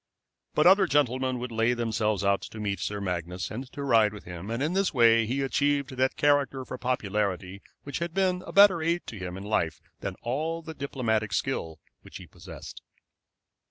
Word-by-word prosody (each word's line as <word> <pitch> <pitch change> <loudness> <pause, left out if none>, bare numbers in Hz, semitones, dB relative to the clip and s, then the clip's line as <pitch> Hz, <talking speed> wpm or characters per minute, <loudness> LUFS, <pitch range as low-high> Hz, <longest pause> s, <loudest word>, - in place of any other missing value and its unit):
But 150 - +3
other 190 +1 +6
gentlemen 130 -3 +1
would 125 0 -5
lay 115 +2 +2
themselves 110 -4 0
out 100 0 +2
to 110 - -9
meet 100 -3 -2
Sir 105 +3 -3
Magnus 90 -1 -3
and 125 +4 -6
to 145 - -5
ride 115 -6 +4
with 105 - -10
him, 90 +3 -8
and 115 +4 -2
in 155 +4 0
this 195 0 +1
way 115 -4 +5
he 135 +4 -1
achieved 140 +1 +1
that 130 +1 +1
character 140 -3 +2
for 130 - -7
popularity 100 -6 -2 0.2
which 140 +1 -5
had 170 0 -3
been 185 0 +1
a - - -6
better 200 -4 +6
aid 170 +2 0
to 110 - -8
him 90 0 -5
in 95 - -7
life 100 -6 -1 0.2
than - - -4
all 160 +7 -2
the 160 - -7
diplomatic 115 -7 -1
skill 80 - -2 0.2
which - - -11
he - - -11
possessed. - - -11
125 Hz, 195 wpm, -27 LUFS, 105-145 Hz, 0.2 s, other